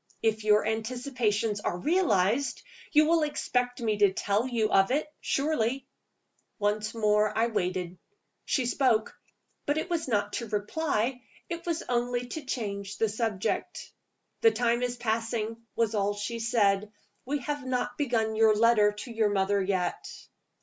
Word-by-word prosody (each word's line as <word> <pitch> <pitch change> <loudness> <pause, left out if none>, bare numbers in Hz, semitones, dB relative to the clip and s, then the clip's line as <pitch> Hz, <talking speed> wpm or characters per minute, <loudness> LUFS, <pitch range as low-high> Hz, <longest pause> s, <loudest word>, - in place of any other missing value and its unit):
If 220 -1 +1
your 210 0 +4
anticipations 225 -2 -1
are 175 - -2
realized, 255 - +1 0.3
you 305 0 +5
will 330 +1 +3
expect 250 -4 -1
me 215 -3 0
to 205 -2 +5
tell 205 +5 0
you 225 -4 0
of 195 0 +4
it, 285 +4 +1
surely?" 275 -3 0 0.7
Once 215 +1 -1
more 210 -1 +2
I 225 - +4
waited. 180 -5 -2 0.4
She 260 - 0
spoke 240 -3 +1 0.5
but 290 +1 +1
it 350 +3 -3
was 330 -4 -1
not 205 -3 0
to 235 - -3
reply: 235 +3 -1 0.3
it 340 0 -5
was 335 -1 -1
only 245 0 0
to 310 +4 -5
change 200 -5 -4
the 225 - +1
subject. 215 -3 -2 0.5
"The 455 - +7
time 235 - +1
is 245 0 -2
passing," 225 -1 -2 0.2
was 225 -1 +1
all 205 -1 0
she 205 +3 -4
said. 210 -3 +1 0.3
"We 285 +3 -1
have 290 +2 -3
not 255 -1 -2
begun 230 -6 0
your 220 -1 +5
letter 215 -2 +4
to 210 +4 -8
your 220 -2 +2
mother 200 0 +1
yet." 185 -2 -1
225 Hz, 150 wpm, -28 LUFS, 210-250 Hz, 0.7 s, The